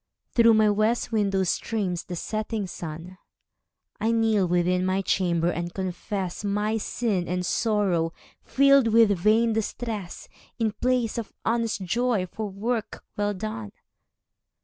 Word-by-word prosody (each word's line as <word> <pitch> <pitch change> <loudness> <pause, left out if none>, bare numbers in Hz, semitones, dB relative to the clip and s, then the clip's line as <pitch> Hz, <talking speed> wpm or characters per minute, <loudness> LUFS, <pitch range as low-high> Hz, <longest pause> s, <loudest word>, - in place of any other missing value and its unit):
Through 230 -1 +5
my 215 0 +4
west 215 +4 +1
window 200 -3 +1
streams 185 -1 -2
the 175 - -5
setting 215 +3 -3
sun. 170 +1 -8 0.8
I 220 +2 +1
kneel 220 -4 +2
within 180 +1 +1
my 190 +1 0
chamber, 175 -3 +1
and 175 0 -4
confess 190 0 -4
My 210 +2 0
sin 205 -4 -1
and 180 0 -2
sorrow, 195 -7 +1 0.3
filled 275 -2 +4
with 225 -1 +5
vain 215 +5 +3
distress, 220 -3 -4 0.3
In 225 -3 +1
place 240 0 0
of 225 - -6
honest 230 -3 0
joy 230 +1 0
for 210 +3 -5
work 220 +3 -3
well 205 0 -1
done. 180 - -5
205 Hz, 130 wpm, -25 LUFS, 180-225 Hz, 0.8 s, Through